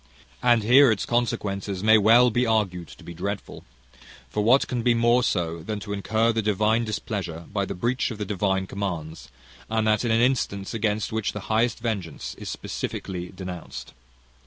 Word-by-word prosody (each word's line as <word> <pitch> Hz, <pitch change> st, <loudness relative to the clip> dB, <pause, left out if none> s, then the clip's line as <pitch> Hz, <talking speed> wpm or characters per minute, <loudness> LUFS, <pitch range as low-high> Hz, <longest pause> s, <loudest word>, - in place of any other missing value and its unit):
"And 120 Hz, -3 st, +4 dB
here 130 Hz, +5 st, +7 dB
its 105 Hz, -, -1 dB
consequences 100 Hz, -5 st, -1 dB
may 110 Hz, 0 st, +6 dB
well 120 Hz, +4 st, +6 dB
be 120 Hz, +3 st, +1 dB
argued 100 Hz, -7 st, 0 dB
to -, -, -14 dB
be 85 Hz, -, -8 dB
dreadful; 100 Hz, +4 st, -5 dB, 0.7 s
for 105 Hz, -, 0 dB
what 125 Hz, +6 st, +4 dB
can 125 Hz, -2 st, -2 dB
be 120 Hz, 0 st, +3 dB
more 120 Hz, +1 st, +4 dB
so, 85 Hz, -8 st, -1 dB
than 105 Hz, +5 st, -4 dB
to 100 Hz, 0 st, -5 dB
incur 110 Hz, +3 st, +1 dB
the 110 Hz, -, 0 dB
divine 105 Hz, +2 st, +2 dB
displeasure, 100 Hz, -6 st, -4 dB
by 100 Hz, -2 st, 0 dB
the 100 Hz, -, -5 dB
breach 120 Hz, +7 st, 0 dB
of 115 Hz, -, -6 dB
the 105 Hz, -, -3 dB
divine 95 Hz, -1 st, 0 dB
commands; 85 Hz, -7 st, -5 dB, 0.4 s
and 110 Hz, 0 st, 0 dB
that 110 Hz, +1 st, +2 dB
in 120 Hz, -, 0 dB
an 115 Hz, 0 st, +3 dB
instance 115 Hz, -6 st, 0 dB
against 110 Hz, -1 st, -1 dB
which 110 Hz, -2 st, -1 dB
the 105 Hz, -, -5 dB
highest 115 Hz, +1 st, +2 dB
vengeance 100 Hz, -9 st, -4 dB
is -, -, -6 dB
specifically 90 Hz, -2 st, -5 dB
denounced? 90 Hz, -7 st, -8 dB
105 Hz, 180 wpm, -25 LUFS, 95-115 Hz, 0.7 s, here